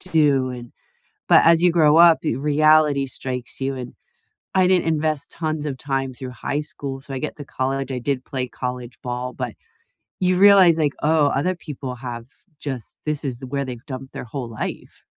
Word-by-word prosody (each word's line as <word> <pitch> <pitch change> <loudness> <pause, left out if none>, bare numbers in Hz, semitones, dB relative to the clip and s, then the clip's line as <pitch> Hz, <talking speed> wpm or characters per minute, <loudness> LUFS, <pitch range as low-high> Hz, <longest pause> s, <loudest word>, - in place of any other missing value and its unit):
do, 145 -7 +2
and" 120 -1 -9 0.6
But - - +7
as 165 0 +6
you 175 - +5
grow 155 -2 +4
up, 170 -1 +8
y - - +1
reality 150 0 +3
strikes 130 -1 -5
you, 135 0 -1
and 125 -1 -7 0.6
I 185 -1 +4
didn't 180 -3 +3
invest 155 -2 0
tons 155 -2 -3
of 135 -3 -4
time 135 -1 -2
through 130 0 -7 0.2
high 145 - +1
school, 140 -3 -6
so 135 - -9
I 135 - -3
get 155 - -4
to 145 - -8
college 135 -1 -2
I 130 - -2
did 130 +1 -2
play 130 -3 -3
college 125 -1 -6
ball, 125 0 -4
but - - -5 0.7
you 185 -1 +2
realize, 190 -4 +7
like, 150 -3 +1
"Oh, 155 -1 +4
other 180 +7 0
people 140 -6 -7
have 120 -2 -7 0.3
just 130 -6 -5
this 150 -1 -1
is 130 -4 -3
th 130 0 -8
where 140 -1 -1
they've 125 -2 -7
dumped 130 +1 -7
their - - -6
whole 130 -3 -4 0.2
life, - - -8
140 Hz, 195 wpm, -22 LUFS, 130-155 Hz, 0.7 s, up